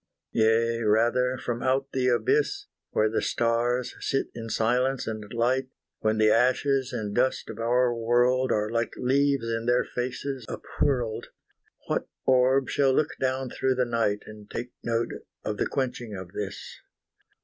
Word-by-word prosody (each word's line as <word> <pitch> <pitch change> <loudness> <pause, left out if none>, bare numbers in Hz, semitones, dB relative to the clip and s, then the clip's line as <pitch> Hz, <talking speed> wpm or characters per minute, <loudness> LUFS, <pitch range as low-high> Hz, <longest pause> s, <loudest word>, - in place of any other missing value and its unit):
Yea 115 +1 +2
rather, 120 +4 +2
from 120 -1 -3
out 135 +1 0
the 130 -1 0
abyss, 400 - +1 0.2
Where 110 - +2
the 110 - 0
stars 120 +1 0
sit 135 - -1
in 115 -1 -7
silence 125 +4 +1
and 110 -2 -5
light, 125 +3 +1 0.3
When 110 0 +1
the 110 0 +5
ashes 130 +2 +2
and 105 -2 -3
dust 130 +3 0
of - - -10
our 120 +1 +2
world 120 +3 +2
Are 105 +1 0
like 115 0 -1
leaves 140 0 +2
in 115 0 -2
their 125 0 +3
faces 130 +1 -4
up - - -6 0.2
whirled, 120 -6 0 0.6
What - - -1 0.2
orb 130 +1 +4
shall 135 -2 +2
look 155 +2 +1
down 130 -1 -1
through 130 0 0
the 125 0 +2
night, 115 -3 0
And 105 -1 -12
take 120 +1 -5
note 115 0 0 0.3
of 105 -1 -3
the - - 0
quenching 120 -5 -3
of 95 -2 -8
this? 100 0 -6
120 Hz, 160 wpm, -27 LUFS, 115-130 Hz, 0.6 s, the